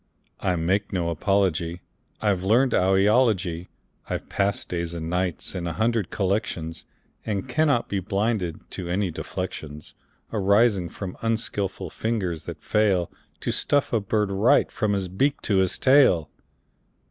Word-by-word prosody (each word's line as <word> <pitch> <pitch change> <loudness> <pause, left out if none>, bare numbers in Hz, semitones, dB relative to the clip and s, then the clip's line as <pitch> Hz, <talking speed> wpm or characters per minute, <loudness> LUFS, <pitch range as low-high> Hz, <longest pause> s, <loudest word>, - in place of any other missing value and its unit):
I 90 -2 0
make 95 +5 0
no 85 -3 -1
apology; 85 -1 0 0.4
I've 100 -4 +2
learned 120 +7 +3
owl 95 +1 +3
eology. 95 -5 +2 0.4
I've - - -4
passed 100 0 0
days 85 -1 -3
and 80 0 -4
nights 90 -3 -1
in 90 -2 -3
a 85 - -2
hundred 110 -3 0
collections, 90 -5 -2 0.4
And 105 +1 -3
cannot 145 -2 +2
be 100 - -1
blinded 100 -3 -1
to 90 -2 -5
any 95 0 0
deflections 75 -4 -6 0.4
Arising 100 -2 +3
from 95 -3 -7
unskilful 100 -5 -2
fingers 95 -8 -2
that - - -8
fail 100 -5 +2 0.3
To - - -1
stuff 145 -3 +1
a 115 - +4
bird 105 0 0
right, 100 +5 +3
from 110 -3 0
his 95 -2 -1
beak 135 +11 0
to 100 - +1
his 95 -1 +2
tail. 130 - +4
95 Hz, 145 wpm, -25 LUFS, 90-110 Hz, 0.4 s, a